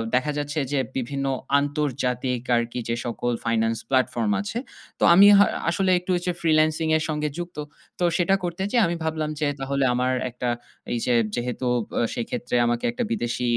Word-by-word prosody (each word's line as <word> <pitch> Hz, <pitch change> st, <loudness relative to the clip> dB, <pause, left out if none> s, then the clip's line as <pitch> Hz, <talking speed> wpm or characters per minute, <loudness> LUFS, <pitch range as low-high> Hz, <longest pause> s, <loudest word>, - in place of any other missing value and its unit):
দেখা 150 Hz, +4 st, +1 dB
যাচ্ছে 145 Hz, +1 st, -2 dB
যে 145 Hz, -, +1 dB, 0.2 s
বিভিন্ন 135 Hz, +2 st, -2 dB, 0.3 s
আন্তর্জা‌তিক 130 Hz, -4 st, -1 dB, 0.2 s
আরকি 120 Hz, +1 st, -2 dB
যে 115 Hz, -, +1 dB
সকল 120 Hz, +1 st, -2 dB
finance 115 Hz, 0 st, +1 dB
platform 125 Hz, -4 st, +1 dB
আছে। 155 Hz, -, -5 dB, 0.4 s
তো -, -, -1 dB
আমি 195 Hz, +4 st, +8 dB
হা 205 Hz, -, +7 dB, 0.2 s
আসলে 185 Hz, +2 st, +1 dB
একটু 180 Hz, +1 st, -4 dB
এই 175 Hz, -, -5 dB
যে -, -, +3 dB
freelancing 155 Hz, 0 st, +2 dB
এর 155 Hz, -, -2 dB
সঙ্গে 150 Hz, 0 st, -1 dB
যুক্ত। 175 Hz, -1 st, -6 dB, 0.4 s
তো -, -, 0 dB
সেটা 180 Hz, +2 st, +3 dB
করতে 175 Hz, +1 st, -3 dB
যেয়ে 240 Hz, -3 st, +4 dB
আমি 170 Hz, -, -1 dB
ভাবলাম 155 Hz, -1 st, -2 dB
যে 150 Hz, -, +1 dB
তাহলে 135 Hz, 0 st, -1 dB
আমার 125 Hz, +1 st, +1 dB, 0.2 s
একটা 125 Hz, 0 st, -3 dB, 0.4 s
এই -, -, 0 dB
যে 125 Hz, -, +2 dB, 0.2 s
যেহেতু 125 Hz, +1 st, -3 dB, 0.2 s
ব -, -, -28 dB, 0.2 s
সেইক্ষেত্রে 120 Hz, +1 st, -3 dB
আমাকে 120 Hz, 0 st, 0 dB
একটা 245 Hz, +1 st, -2 dB
বিদেশি 125 Hz, -, -2 dB
140 Hz, 175 wpm, -24 LUFS, 120-160 Hz, 0.4 s, আমি